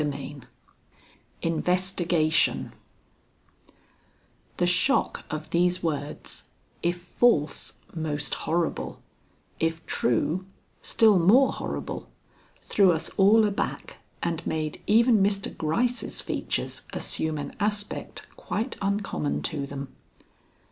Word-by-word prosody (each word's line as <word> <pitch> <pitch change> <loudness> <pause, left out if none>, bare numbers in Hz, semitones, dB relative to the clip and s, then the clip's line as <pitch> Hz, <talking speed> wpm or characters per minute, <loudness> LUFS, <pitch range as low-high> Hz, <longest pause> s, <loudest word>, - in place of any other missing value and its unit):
XXX 140 -2 -4 1.0
INVESTIGATION 170 -1 +1 1.8
The 175 - +2
shock 180 +10 +2
of 155 0 -5
these 180 +1 +2
words 150 -3 -4 0.3
if 175 +1 0
false, 175 -3 +1 0.2
most 150 -3 -2
horrible; 165 0 -1 0.6
if 165 0 -1
true, 160 - 0 0.3
still 220 -5 +4
more 230 +11 +5
horrible - - -5 0.5
threw 195 -3 +4
us 160 -1 -1
all 215 +3 +5
aback 210 - -3 0.3
and 170 -2 -1
made 155 -1 -2
even 225 0 +5
Mr. 195 0 +1
Gryce's 235 +11 0
features - - -2
assume 160 -1 -2
an 145 - -6
aspect 205 0 -2
quite 220 - -3
uncommon 200 -7 -1
to 145 -4 -3
them. 140 -1 -6
175 Hz, 95 wpm, -26 LUFS, 155-205 Hz, 1.8 s, more